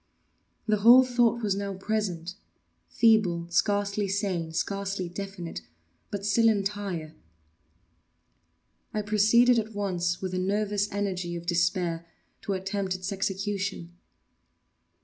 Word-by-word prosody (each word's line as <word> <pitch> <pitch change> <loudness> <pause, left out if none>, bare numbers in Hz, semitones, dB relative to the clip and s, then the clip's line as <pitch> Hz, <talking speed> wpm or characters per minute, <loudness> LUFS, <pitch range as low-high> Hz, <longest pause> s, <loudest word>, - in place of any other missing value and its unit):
The 215 -1 +2
whole 240 +5 +8
thought 240 -2 +1
was 200 -2 +1
now 200 -1 -3
present—feeble, 190 -1 -1
scarcely 205 +2 +1
sane, 190 -5 -2
scarcely 195 +2 -2
definite,—but 170 - -8
still 225 +2 +4
entire. 200 -6 -2 1.8
I 210 - 0
proceeded 220 +4 +4
at 220 -1 -5
once, 180 -3 -1
with 185 -1 -4
the 185 - -2
nervous 205 +2 0
energy 185 -4 -2
of 170 0 -6
despair, 175 -1 0 0.3
to 200 - -2
attempt 190 0 -2
its 185 +1 -5
execution. 195 -2 -3
195 Hz, 105 wpm, -27 LUFS, 175-210 Hz, 1.8 s, whole